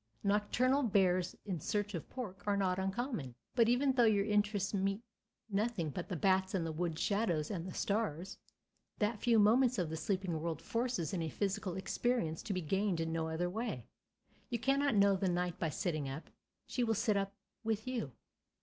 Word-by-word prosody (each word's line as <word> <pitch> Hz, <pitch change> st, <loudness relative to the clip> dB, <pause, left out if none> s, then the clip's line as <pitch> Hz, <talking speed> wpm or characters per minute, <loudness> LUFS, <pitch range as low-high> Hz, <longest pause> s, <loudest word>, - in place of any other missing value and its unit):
Nocturnal 210 Hz, +7 st, +2 dB
bears 185 Hz, -6 st, +2 dB
in 185 Hz, -5 st, -2 dB
search 205 Hz, +6 st, -1 dB
of 170 Hz, -, -5 dB
pork 205 Hz, -7 st, -6 dB
are 200 Hz, -1 st, +2 dB
not 185 Hz, -2 st, +1 dB
uncommon. 190 Hz, -, -2 dB, 0.2 s
But 230 Hz, -2 st, +4 dB
even 265 Hz, +3 st, +3 dB
though 245 Hz, -2 st, +5 dB
your 205 Hz, -3 st, +4 dB
interest 205 Hz, -1 st, +1 dB
meets 195 Hz, +2 st, 0 dB, 0.4 s
nothing 205 Hz, -6 st, -1 dB
but 180 Hz, +7 st, -5 dB
the 185 Hz, -, -2 dB
bats 190 Hz, +3 st, +2 dB
and 175 Hz, -3 st, 0 dB
the 165 Hz, -, -2 dB
woods 165 Hz, 0 st, -2 dB
shadows 200 Hz, -7 st, +1 dB
and 180 Hz, -3 st, -3 dB
the 185 Hz, -, -6 dB
stars, 195 Hz, -3 st, -1 dB, 0.6 s
that 210 Hz, 0 st, 0 dB
few 235 Hz, -2 st, +4 dB
moments 235 Hz, +4 st, +5 dB
of 175 Hz, -4 st, -1 dB
the -, -, -2 dB
sleeping 185 Hz, -2 st, -1 dB
world 165 Hz, -2 st, -2 dB
forces 230 Hz, -2 st, -1 dB
is 185 Hz, -, 0 dB
a 160 Hz, -, -1 dB
psychical 195 Hz, 0 st, -2 dB
experience 190 Hz, -5 st, 0 dB
to -, -, -5 dB
be 185 Hz, -, -1 dB
gained 190 Hz, +2 st, 0 dB
in 165 Hz, 0 st, -1 dB
no 160 Hz, -1 st, -1 dB
other 160 Hz, +2 st, -1 dB
way. 210 Hz, -, -3 dB, 0.6 s
You 235 Hz, -, 0 dB
cannot 275 Hz, +1 st, +2 dB
know 200 Hz, -1 st, +5 dB
the 190 Hz, 0 st, 0 dB
night 175 Hz, -1 st, -1 dB
by 165 Hz, -, 0 dB
sitting 155 Hz, -4 st, -2 dB
up; 135 Hz, +4 st, -7 dB, 0.3 s
she 250 Hz, -, -1 dB
will 225 Hz, -1 st, +2 dB
sit 215 Hz, 0 st, +2 dB
up 195 Hz, 0 st, -1 dB, 0.3 s
with 220 Hz, -1 st, -1 dB
you. 235 Hz, -, -2 dB
195 Hz, 190 wpm, -35 LUFS, 175-220 Hz, 0.6 s, though